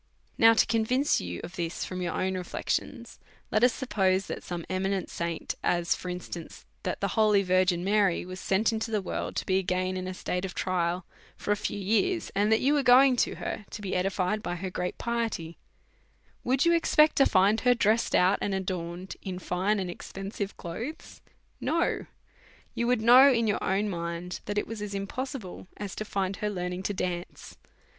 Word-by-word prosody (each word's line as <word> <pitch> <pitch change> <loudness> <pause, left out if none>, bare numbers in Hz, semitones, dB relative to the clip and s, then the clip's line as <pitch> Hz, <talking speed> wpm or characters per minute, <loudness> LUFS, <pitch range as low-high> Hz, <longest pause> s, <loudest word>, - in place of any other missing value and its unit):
Now 225 0 +6
to - - +5
convince 245 +5 +1
you 90 -1 -5
of 175 - -8
this 170 -1 -3
from 185 0 -5
your 175 - -2
own 190 0 0
reflections, 180 -1 -3 0.3
let 215 - +2
us 245 - +6
suppose 195 -7 +1
that - - -5
some 175 -2 -5
eminent 190 0 -1
saint, 170 -1 -3
as 175 -1 +2
for 180 - -6
instance, 175 -2 -7 0.2
that - - -3
the - - 0
holy 210 -3 +3
Virgin 185 -1 +2
Mary 200 -3 +2
was 185 +1 -7
sent 210 +5 +1
into 225 +1 -2
the 215 -1 +1
world - - -4
to - - -2
be 190 0 +2
again 185 0 -1
in 185 0 -4
a 185 - -5
state 180 0 -3
of 190 -2 -5
trial 175 -1 -1 0.3
for - - -3
a - - +4
few 205 - -3
years, 225 - 0
and 205 +2 +2
that 220 - +4
you 280 +3 +3
was 290 -2 +2
going 255 +1 +7
to - - +1
her - - -5
to - - -7
be 200 -2 -3
edified 185 +2 0
by 175 - -3
her 185 +1 -5
great 180 0 -3
piety, 225 -9 -3 0.8
would 260 +4 +2
you 340 - +5
expect 310 -2 +4
to 275 - +6
find 200 +3 +4
her 250 0 +4
dressed 225 0 +2
out 185 +3 +4
and 200 - -1
adorned 180 -1 -4
in 185 -2 -5
fine 185 +3 0
and 185 -2 -3
expensive 195 +2 -6
clothes? 230 - -7 0.4
No; 335 +1 0 0.7
you 235 - -1
would 245 -2 +2
know 255 +4 +8
in 230 -2 +2
your 205 -2 0
own 200 +3 +1
mind 170 -1 -4
that 205 0 -3
it 205 - +1
was 225 -1 -7
as 205 -1 -4
impossible 200 0 -5
as 205 -2 -5
to - - -4
find 195 -1 -2
her 210 -1 -1
learning 180 -2 -3
to 205 - -2
dance. 180 -1 -4
195 Hz, 195 wpm, -28 LUFS, 180-225 Hz, 0.8 s, know